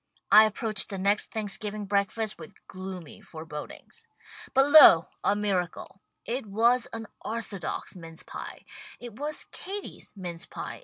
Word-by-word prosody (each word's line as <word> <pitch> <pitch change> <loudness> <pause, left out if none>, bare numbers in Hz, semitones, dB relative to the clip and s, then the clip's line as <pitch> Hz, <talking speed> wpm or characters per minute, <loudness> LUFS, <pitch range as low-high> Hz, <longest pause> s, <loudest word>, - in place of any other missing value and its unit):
I 215 +1 +10
ap 215 0 -2
proached 215 -3 -2
the 195 - -5
next 200 +2 +1
Thanksgiving 210 -1 -3
breakfast 205 +2 0
with 160 - -11
gloomy 185 -4 -8
forebodings. 160 - -9 0.4
But 270 +1 +4
lo, 180 - +9
a 200 - +3
miracle. 195 -2 -2 0.2
It 245 -1 -3
was 230 +4 +3
an 225 0 -5 0.2
orthodox 215 -7 -4
mince 165 -2 -9
pie. - - -9 0.3
It 240 -2 -10
was 300 +1 -3
Katie's 395 +1 -7
mince 175 -3 -6
pie. - - -7
205 Hz, 140 wpm, -28 LUFS, 185-225 Hz, 0.4 s, I